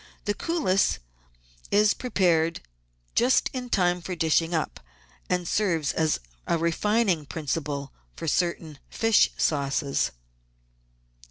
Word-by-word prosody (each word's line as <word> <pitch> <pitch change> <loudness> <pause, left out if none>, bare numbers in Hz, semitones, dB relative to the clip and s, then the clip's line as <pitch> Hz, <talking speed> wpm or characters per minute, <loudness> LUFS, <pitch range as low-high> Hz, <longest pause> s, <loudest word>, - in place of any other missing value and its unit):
This 205 - 0
cullis 195 - +1 0.7
is 210 +1 +4
prepared 170 -9 +1 0.5
just 250 +2 +3
in 250 -1 -5
time 180 -4 +2
for 180 +1 -5
dishing 165 0 +2
up, 160 -3 -2 0.5
and 180 -1 0
serves 170 -8 +1
as 160 -1 +1 0.3
a 170 - +2
refining 170 0 +1
principle 145 -2 -3 0.3
in - - -4
certain 160 -2 -1
fish 225 -1 +3
sauces. 140 -1 0
170 Hz, 105 wpm, -26 LUFS, 155-205 Hz, 0.7 s, is